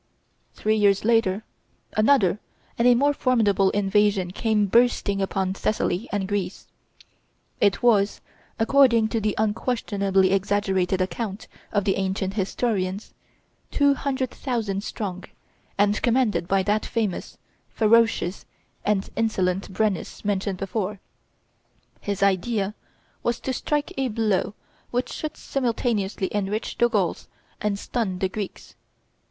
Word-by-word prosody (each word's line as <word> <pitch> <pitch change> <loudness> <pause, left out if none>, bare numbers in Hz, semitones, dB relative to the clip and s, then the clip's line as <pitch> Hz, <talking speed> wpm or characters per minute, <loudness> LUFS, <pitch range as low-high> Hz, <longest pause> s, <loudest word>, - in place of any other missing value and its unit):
Three 215 +1 +1
years 200 -1 +3
later, 220 -3 +2 0.5
another 215 -4 +3 0.4
and 235 - +3
a 245 - +7
more 285 +4 +3
formidable 215 -8 +2
invasion 200 -2 +2
came 215 +1 +1
bursting 205 -2 +2
upon 190 -1 -1
Thessaly 210 0 -1
and 200 -2 -1
Greece. 200 -2 -3 0.9
It 200 +4 +2
was, 210 -4 +3 0.4
according 235 -2 +4
to 225 - -1
the 210 -1 0
unquestionably 205 -3 +1
exaggerated 195 -1 +1
account 200 +2 -3 0.2
of 205 -1 +1
the 195 -1 +1
ancient 190 0 -1
historians, 195 -1 -2 0.6
two 285 0 +3
hundred 265 -2 -2
thousand 215 -6 -2
strong, 190 -4 -5 0.5
and 205 +1 +2
commanded 230 -9 +1
by 195 0 +2
that 210 +2 +1
famous, 215 -6 -3 0.3
ferocious, 225 -4 +2 0.4
and 205 -2 +1
insolent 195 -4 0
Brennus 205 0 -2
mentioned 200 -1 -1
before. 195 +1 -3 1.0
His 200 -1 -2
idea 200 +1 +1 0.5
was 240 0 -1
to 260 - -2
strike 295 +3 -1
a 265 - +1
blow 210 -3 0 0.3
which 245 +1 -2
should 310 0 -5
simultaneously 225 -6 -1
enrich 205 +2 -2
the 240 - +4
Gauls 200 -7 -1 0.3
and 210 -1 0
stun 200 -3 -2
the 190 +1 0
Greeks. 200 0 -6
205 Hz, 120 wpm, -24 LUFS, 195-230 Hz, 1.0 s, a